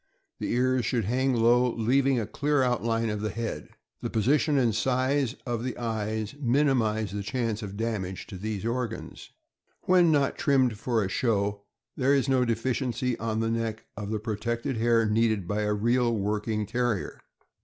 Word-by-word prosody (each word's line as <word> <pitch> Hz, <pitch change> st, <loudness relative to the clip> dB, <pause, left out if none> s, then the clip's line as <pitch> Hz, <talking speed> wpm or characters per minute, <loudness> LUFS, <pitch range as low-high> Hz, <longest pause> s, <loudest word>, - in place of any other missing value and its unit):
The -, -, -2 dB
ears 130 Hz, +1 st, +2 dB
should 115 Hz, -3 st, 0 dB
hang 130 Hz, +4 st, +1 dB
low, 120 Hz, +2 st, +4 dB
leaving 130 Hz, +3 st, +2 dB
a 110 Hz, -, -2 dB
clear 145 Hz, +4 st, +1 dB
outline 115 Hz, -2 st, 0 dB
of 105 Hz, -1 st, -3 dB
the 110 Hz, -, -1 dB
head. 110 Hz, -8 st, -4 dB, 0.3 s
The -, -, -3 dB
position 145 Hz, +6 st, +2 dB
and 120 Hz, -4 st, +3 dB
size 130 Hz, +3 st, +1 dB
of 120 Hz, -2 st, -2 dB
the 130 Hz, -, -4 dB
eyes 110 Hz, -1 st, -3 dB
minimize 120 Hz, -6 st, +1 dB
the 100 Hz, 0 st, -3 dB
chance 115 Hz, 0 st, -2 dB
of 100 Hz, -2 st, -6 dB
damage 105 Hz, -5 st, -3 dB
to 95 Hz, -, -9 dB
those 105 Hz, 0 st, -4 dB
organs. 120 Hz, 0 st, -4 dB, 0.5 s
When 180 Hz, -2 st, +5 dB
not 140 Hz, -2 st, +1 dB
trimmed 130 Hz, -7 st, +2 dB
for 115 Hz, -2 st, 0 dB
a -, -, -1 dB
show, 100 Hz, -1 st, 0 dB, 0.3 s
there 135 Hz, +1 st, +3 dB
is 135 Hz, -1 st, +1 dB
no 130 Hz, -2 st, +3 dB
deficiency 125 Hz, +1 st, -1 dB
on 110 Hz, -1 st, -1 dB
the 115 Hz, 0 st, 0 dB
neck 115 Hz, -1 st, -2 dB
of 105 Hz, 0 st, -5 dB
the 110 Hz, -, -1 dB
protected 115 Hz, +4 st, -3 dB
hair 115 Hz, 0 st, +3 dB
needed 110 Hz, -3 st, +1 dB
by 105 Hz, +2 st, -1 dB
a 105 Hz, 0 st, 0 dB
real 120 Hz, +2 st, +2 dB
working 105 Hz, +1 st, -1 dB
Ter 120 Hz, +2 st, 0 dB
rier. 95 Hz, -, -7 dB
115 Hz, 175 wpm, -27 LUFS, 110-125 Hz, 0.5 s, When